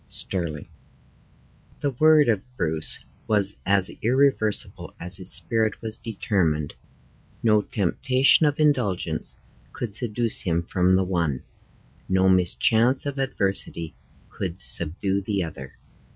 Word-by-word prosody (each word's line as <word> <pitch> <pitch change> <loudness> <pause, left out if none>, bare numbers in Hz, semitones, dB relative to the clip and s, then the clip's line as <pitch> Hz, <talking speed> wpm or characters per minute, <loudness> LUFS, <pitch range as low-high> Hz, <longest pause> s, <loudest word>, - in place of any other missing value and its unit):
Stirling. 85 -6 -4 1.1
The 140 - -1
word 155 +3 +3
of 110 -5 +1 0.2
Bruce 80 0 -1 0.2
was 105 -2 +4
as 100 -1 +3
irreversible 125 -3 -1
as 90 +1 0
his 95 -1 +2
spirit 110 -3 +4
was 110 -1 -6
determined. 95 -10 -2 0.7
No 105 -2 +3
temptation 130 - +1
of 145 0 -2
indulgence 105 - -1 0.4
could 115 -4 -6
seduce 115 0 +2
him 85 -1 -1
from 90 +1 +1
the 95 - +1
one, 85 -8 -2 0.7
no 95 0 +2
mischance 110 +8 +2
of 140 -1 -5
adversity 95 -9 -3 0.4
could 95 -1 -6
subdue 95 +4 +3
the 100 -1 -3
other. 65 -5 -10
100 Hz, 115 wpm, -23 LUFS, 90-120 Hz, 1.1 s, was